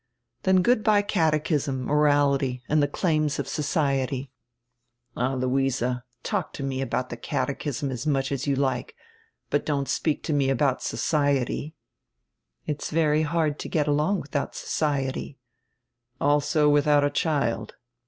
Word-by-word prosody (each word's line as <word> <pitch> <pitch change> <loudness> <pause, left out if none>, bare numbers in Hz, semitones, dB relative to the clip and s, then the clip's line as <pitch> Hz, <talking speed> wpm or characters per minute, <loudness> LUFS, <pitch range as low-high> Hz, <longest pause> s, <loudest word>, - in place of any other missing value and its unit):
"Then 185 -1 +3
good 240 -1 +3
by 210 -2 +4
catechism, 155 -8 0
morality, 140 -3 +2
and 150 0 +3
die 145 - +3
claims 155 -1 0
of 140 - -3
society. 140 -3 -1 0.8
"All, 130 +2 0
Luise, 130 0 0 0.4
talk 205 -6 -2
to 140 - -6
me 135 -1 -2
about 130 -1 -2
die 120 - -5
catechism 135 +1 -2
as 125 +3 -4
much 135 -2 +1
as 140 +1 -2
you 140 - +2
like, 130 -2 -1 0.6
but 145 - +1
don't 140 -2 -1
speak 155 -3 -1
to 155 - -1
me 140 -2 +2
abont 135 0 +1
'society.'" 145 0 0 0.9
"It 150 -1 -3
is - - -3
very 155 -1 +2
hard 155 -1 0
to - - -5
get 155 -3 0
along 150 +7 +1
widiout 140 0 -3
'society.'" 135 -2 -2 0.8
"Also 145 +1 +2
widiout 145 0 +4
a 145 - 0
child. 140 -9 -1
145 Hz, 145 wpm, -25 LUFS, 135-155 Hz, 0.9 s, by